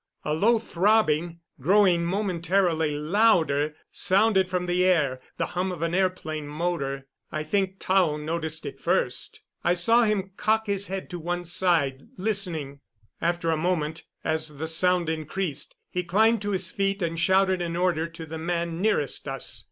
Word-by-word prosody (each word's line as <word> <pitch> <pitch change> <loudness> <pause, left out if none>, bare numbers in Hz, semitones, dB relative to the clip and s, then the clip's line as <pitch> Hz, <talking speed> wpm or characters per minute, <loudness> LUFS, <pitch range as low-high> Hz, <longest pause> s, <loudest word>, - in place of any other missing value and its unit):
A 150 - 0
low 220 +9 +3
throbbing, 175 -5 +1 0.2
growing 180 +2 +4
momentarily 175 -4 +1
louder, 155 -4 +2 0.2
sounded 190 -1 +3
from 180 -1 -1
the 180 +1 +1
air 150 -9 +2 0.2
the - - 0
hum 185 +1 -2
of 170 -3 -5
an 165 0 -1
airplane 175 -5 -1
motor. 145 -4 -2 0.3
I 155 0 -2
think 190 +2 0
Tao 185 -6 +2
noticed 160 +1 -3
it - - -7
first - - -1 0.2
I 175 - +3
saw 230 +7 +4
him 200 -3 -1
cock 220 +1 +1
his 200 -1 -1
head 190 0 -4
to 175 - -5
one 175 +2 -3
side, 165 -7 +1 0.2
listening. 180 -9 -2 0.4
After 170 -1 0
a 160 - +1
moment, 160 -1 -1 0.2
as 160 0 -1
the 150 +1 -6
sound 175 +1 +1
increased, 155 -1 -3 0.2
he 180 - -1
climbed 220 +5 +3
to 205 - -2
his 185 -2 -1
feet 195 -1 -1
and 165 -1 -2
shouted 190 0 +3
an 170 -1 -2
order 175 -2 +1
to 165 0 -9
the 160 +1 -7
man 170 0 -2
nearest 200 -10 0
us. - - -3
175 Hz, 160 wpm, -26 LUFS, 160-190 Hz, 0.4 s, growing